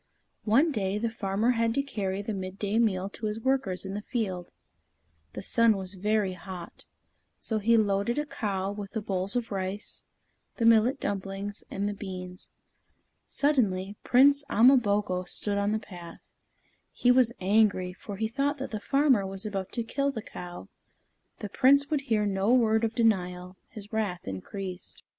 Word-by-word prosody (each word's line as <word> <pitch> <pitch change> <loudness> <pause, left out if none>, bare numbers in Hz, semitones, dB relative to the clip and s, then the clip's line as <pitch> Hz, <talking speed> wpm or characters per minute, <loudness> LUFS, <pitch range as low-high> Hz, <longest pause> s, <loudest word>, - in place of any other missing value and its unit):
One 270 +10 +4
day, 200 -5 -1
the 225 +1 -1
farmer 220 +1 0
had 230 -1 +1
to 275 - +1
carry 200 -7 -3
the 220 - -3
midday 195 +3 -2
meal 195 -5 +1
to 215 +1 -5
his 210 +1 -3
workers 225 -8 0
in 190 - -5
the 205 - -3
field. 195 -7 -3 0.8
The - - -6
sun 230 -3 +3
was 190 0 -5
very 205 0 0
hot, 180 -2 -9 0.5
so 220 -2 -2
he 230 +2 +4
loaded 205 +2 +1
a 295 - 0
cow 195 -8 -2
with 205 -1 -7
the 220 - -2
bowls 195 0 -1
of 240 -2 -2
rice, 195 +2 -4 0.5
the 230 - 0
millet 230 +4 +5
dumplings, 195 +1 -4
and 200 +1 -2
the 205 - -2
beans. 185 -2 -8 0.8
Suddenly, 205 -9 +1
Prince 280 +3 +5
Ama 245 +6 +6
boko 200 -5 0
stood 200 +2 -1
in 200 +1 +1
the 215 - +1
path. 175 -5 -11 0.6
He 245 - +3
was 250 -2 +4
angry, 195 -2 +2
for 200 +2 -8
he 220 +2 0
thought 280 +5 -1
that 265 - -5
the 215 - -3
farmer 275 -3 +3
was 195 +2 -5
about 195 -3 -4
to 235 - -1
kill 275 +5 -1
the 230 -6 -5
cow. 175 - -9 0.7
The 210 - -4
Prince 280 +7 +4
would 295 -2 +1
hear 220 -6 +1
no 195 +2 +1
word 225 -3 +3
of 225 +1 -1
denial; 180 -5 0
his 210 0 -10
wrath 200 -5 -2
increased. 180 - -6
210 Hz, 170 wpm, -28 LUFS, 190-230 Hz, 0.8 s, Ama